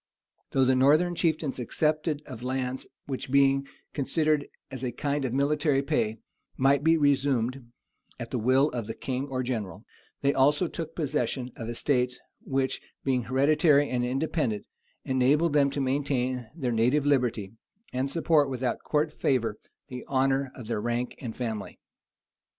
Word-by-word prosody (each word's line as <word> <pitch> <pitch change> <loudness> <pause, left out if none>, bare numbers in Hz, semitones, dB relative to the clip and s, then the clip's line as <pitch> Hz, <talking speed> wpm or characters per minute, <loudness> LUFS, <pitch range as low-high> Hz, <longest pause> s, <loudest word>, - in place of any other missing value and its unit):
Though 135 -1 +3
the 130 - +4
northern 150 +7 +4
chieftains 155 -5 -1
accepted 150 +4 0
of 125 -4 -9
lands 130 0 -3 0.2
which, 130 -1 -5
being 135 0 +3 0.3
considered 150 +1 +1 0.2
as 130 -1 -6
a 125 - -1
kind 140 +3 -2
of 125 - -2
military 140 +1 +1
pay, 115 -7 0 0.4
might 135 +1 +3
be 165 +1 +5
resumed 135 -4 +1 0.5
at 120 -1 -6
the 125 - -1
will 130 +6 +3
of 120 -4 -4
the 115 - -5
king 130 +1 -3
or 130 -2 -2
general, 115 -6 -4 0.4
they 140 0 +2
also 145 +6 +3
took 165 0 -6
possession 135 -4 -1
of 115 -1 -6
estates 125 +1 0 0.2
which, 135 -1 -1 0.2
being 130 -3 0
hereditary 145 +2 +3
and 125 -1 0
independent, 130 - -1 0.4
enabled 140 +5 +2
them 140 -2 +4
to 140 - -4
maintain 130 -3 -1
their 130 -7 -2
native 125 +6 +2
liberty, 125 -8 +1 0.4
and 130 +2 -1
support, 155 -2 +2
without 130 -1 -2
court 150 0 0
favor, 115 -8 0 0.3
the 125 -2 -6
honor 135 0 +1
of 125 - -9
their 110 -2 -2
rank 120 +2 -2
and 115 -3 -6
family. 110 -4 -4
135 Hz, 150 wpm, -27 LUFS, 125-145 Hz, 0.5 s, be